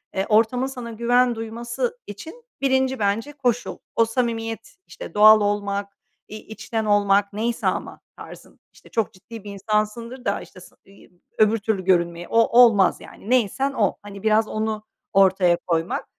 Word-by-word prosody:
eee, 190 0 0
ortamın 230 +4 +2
sana 245 -3 -7
güven 240 +2 +2
duyması 235 - -4
için 320 - -10 0.2
1'inci, 265 -2 +1
bence, 215 +8 -1
koşul. 245 -4 -2 0.2
O 230 - +4
samimiyet, 225 -1 -3
işte, - - -10
doğal 215 +1 +7
olmak, 200 -1 -2 0.3
i 215 - -9
içten 220 +1 -5
olmak, 200 -1 +2
neyse 230 +3 -2
ama - - -3 0.2
tarzın, - - -13
işte, - - -19
çok 225 -1 -2
ciddi 215 +3 -12
bir 205 - -8
insansındır 215 +5 -3
da, 200 - -1
işte, 185 - -14
sa 180 - -16
i 195 0 -19 0.3
öbür 215 +1 +4
türlü 205 -2 -2
görünmeye 170 -2 +1
o 230 +1 +3
olmaz, 205 -6 +5
yani, 210 - -12
neysen 255 +3 +1
o. 205 -6 0
Hani, 200 -1 -11
biraz 220 0 +3
onu 215 0 -3 0.3
ortaya 190 -3 +4
koymak. 165 0 -1
220 Hz, 155 wpm, -22 LUFS, 200-235 Hz, 0.3 s, doğal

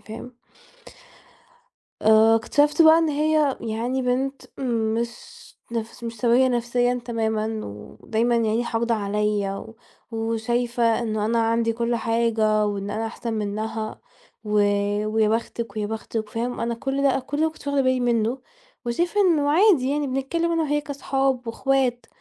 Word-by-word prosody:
فاهم؟ 240 +3 -10 1.7
آآ، 220 +1 +6
اكتشفت 290 +7 +3
بقى 320 0 +8
إن 325 - +2
هي 300 -1 +2
يعني 235 +4 -2
بنت 265 +2 -1 0.2
مش 230 -2 0 0.6
نفس 230 +1 -5
مش 230 0 -5
سوية 245 +3 +3
نفسيًا 245 0 0
تمامًا 220 -2 -1
ودايمًا 220 - -2
يعني 230 +1 +1
حاقدة 230 0 0
عليّا، 205 -1 -1 0.4
وشايفة 230 +1 0
إنه 215 -2 -1
أنا 230 +2 +1
عندي 230 0 +1
كل 235 +1 -1
حاجة 225 -2 +1
وإن 200 -1 -3
أنا 220 +2 -2
أحسن 230 +1 -5
منّها 215 +1 -4 0.4
و 210 - -6 0.6
ويا 215 0 +2
بختِك 225 -1 -3
ويا 210 -1 -1
بختِك، 220 0 -4
فاهم؟ 240 +3 -3
أنا 235 0 -1
كل 270 +4 -2
ده 280 - +4
أنا 265 - +1
كل 285 +3 -5
ده 310 - +2
ما 320 - +3
كنتش 315 -2 -16
واخدة 285 -1 +1
بالي 260 -1 +2
منّه 235 0 +1 0.5
وشايفة 345 +12 0
إنه 315 -7 +3
عادي 320 -6 +4
يعني 290 0 0
بنتكلّم 275 +6 -1
أنا 330 -1 +1
وهي 295 0 0
كاصحاب 270 -3 -1
وإخوات، 255 +1 0
235 Hz, 145 wpm, -23 LUFS, 220-270 Hz, 1.7 s, بقى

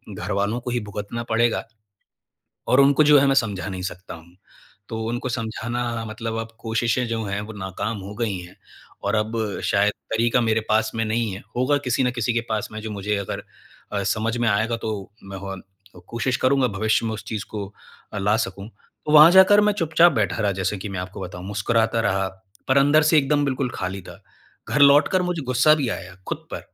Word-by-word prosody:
घरवालों 100 +4 -1
को 125 - -4
ही 120 - 0
भुगतना 105 +4 -5
पड़ेगा 115 +1 +2 1.1
और 130 - +5
उनको 140 +2 +5
जो 145 -1 +7
है 140 - +3
मैं 135 - +3
समझा 105 -7 0
नहीं 95 -1 -5
सकता 95 0 -6
हूँ। 85 +2 -15 0.5
तो 110 -1 -4
उनको 120 +3 -3
समझाना 115 0 -3
मतलब 110 +1 -5
अब 115 0 -4
कोशिशें 115 +2 0
जो 115 -1 -2
हैं 100 0 -3
वो 110 - -8
नाक़ाम 105 +2 -4
हो 100 +2 -8
गई 110 -5 -2
हैं। 90 0 -11 0.5
और - - 0
अब 110 +2 -1 0.3
शायद 100 +1 +2 0.2
तरीक़ा 115 +2 +2
मेरे 110 -1 +2
पास 110 0 +2
में 115 0 0
नहीं 110 0 -1
है, 95 - -7
होगा 130 +4 +2
किसी 125 +1 +1
न 125 - +2
किसी 120 -1 -1
के 115 - +2
पास 110 -1 -1
में 110 - -6
जो 110 - -5
मुझे 105 0 -2
अगर 100 -1 -4 0.5
अ, 100 - -1
समझ 110 +3 -1
में 120 -1 +2
आएगा 110 +3 +1
तो 110 -4 -5
मैं 95 0 -8
और 95 -1 -7 0.5
कोशिश 115 +2 -1
करूँगा 130 0 +3
भविष्य 110 +2 +1
में 110 - -2
उस 105 -1 -8
चीज़ 110 -2 -4
को 105 -2 -4 0.5
अ, 105 - -4
ला 105 +2 +2
सकूँ। 105 -2 -4 0.4
तो 150 - 0
वहाँ 155 +2 +9
जाकर 190 +2 +7
मैं 210 - +3
चुपचाप 165 -1 +4
बैठा 110 -2 0
रहा 100 - +1
जैसे 95 +2 -2
कि 100 - -6
मैं 95 -2 -5
आपको 90 +2 -7
बताऊँ, 90 0 -7
मुस्कुराता 110 +3 +1
रहा, 95 -3 +1 0.4
पर 130 - +4
अंदर 145 +3 +5
से 155 +1 +4
एकदम 145 +1 +2
बिल्कुल 135 -2 -1
खाली 95 +1 -4
था। - - -13 0.5
घर 150 - 0
लौटकर 145 +6 +6
मुझे 180 -4 -2
गुस्सा 130 +5 +5
भी 140 -5 -1
आया - - -6
खुद - - -5
पर - - -4
115 Hz, 205 wpm, -23 LUFS, 100-125 Hz, 1.1 s, वहाँ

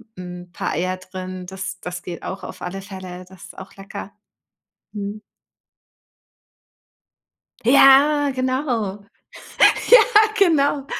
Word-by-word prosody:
hm, 180 -1 -9
paar - - -3
Eier 185 +3 -2
drin, 185 0 -8
das 190 0 -6
das 180 0 -7
geht 175 -1 -7
auch 190 - -6
auf - - -9
alle 195 +2 -6
Fälle, 185 -2 -9
das 190 -2 -14
ist - - -14
auch 190 +1 -11
lecker. 200 0 -9 0.8
Mhm. 205 0 -6 2.4
Ja. 275 +3 +5
genau. 255 -6 -2 0.5
Ja, - - +6 0.4
genau. 290 -6 +2
195 Hz, 110 wpm, -21 LUFS, 185-260 Hz, 2.4 s, Ja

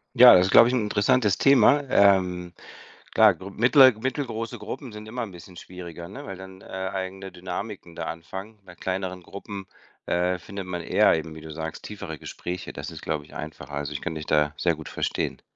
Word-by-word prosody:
Ja, - - +10
das 90 0 +6
ist, - - -2
glaube 115 - +8
ich, 125 - 0
'n 130 - +2
interessantes 105 0 +2
Thema. 140 +1 +5
Ähm, 90 -5 +3 0.6
klar, 110 -3 +7
gr 95 +4 -10
mittle 130 +5 +6
mittelgroße 115 -3 -3
Gruppen 130 -6 -7
sind 105 0 -9
immer 120 +2 -4
'n 110 -4 -6
bisschen 90 +1 -13
schwieriger, 85 -2 -9
ne, 100 - -9
weil 95 - -6
dann, 95 0 -11
äh, - - -16
eigene 95 0 -5
Dynamiken 90 0 -6
da - - -5
anfangen. 95 +6 -7
Bei 90 - -12
kleineren 95 0 -4
Gruppen, 100 +1 -8 0.4
äh, 90 +1 +1
findet 95 +2 -7
man 90 -2 -4
eher - - +4
eben, 80 0 -5
wie 80 - -10
du 80 0 -10
sagst, 80 +1 -6
tiefere 100 -7 -7
Gespräche. 90 +6 -6
Das - - -6
ist, - - -9
glaube 75 -2 -3
ich, - - -16
einfacher. 75 -1 -8
Also, 75 0 -3
ich 70 - -5
kann 90 - -3
dich 75 -1 -6
da 75 -1 +2
sehr 85 -2 +2
gut 80 - -9
verstehen. - - -2
95 Hz, 205 wpm, -25 LUFS, 85-105 Hz, 0.6 s, Ja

